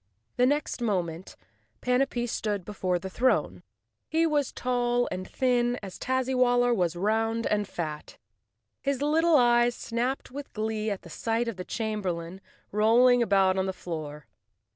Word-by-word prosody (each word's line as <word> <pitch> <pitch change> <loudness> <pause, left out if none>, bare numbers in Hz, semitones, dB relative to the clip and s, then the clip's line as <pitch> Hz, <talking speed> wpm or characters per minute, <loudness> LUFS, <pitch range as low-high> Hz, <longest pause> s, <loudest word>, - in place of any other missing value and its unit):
The 250 0 +4
next 290 -2 -1
moment 180 -6 -2 0.4
Panapee 250 -1 +1
stood 210 -5 -2
before 185 -3 -1
the 175 - -6
throne.' 245 +7 +1 0.5
He 325 +1 +2
was 295 -4 +1
as - - -11
tall 245 -1 0
and 185 0 -5
thin 245 -2 +1
as 190 -2 -8
Tazzywaller 250 -2 +2
was 175 -4 0
round 225 +4 0
and 210 -1 0
fat. 155 -3 -6 0.6
His 280 0 -1
little 325 +2 +3
eyes 240 -2 +4
snapped 245 +4 -3
with 280 +2 -8
glee 220 0 -2
at 195 -4 -5
sight 230 +5 -1
of 230 -5 -4
the 180 - -4
chamberlain 190 -5 -3 0.3
rolling 240 +4 +5
about 195 -3 +3
on 190 - 0
the 190 - -2
floor. 155 -5 -6
230 Hz, 145 wpm, -27 LUFS, 190-250 Hz, 0.6 s, rolling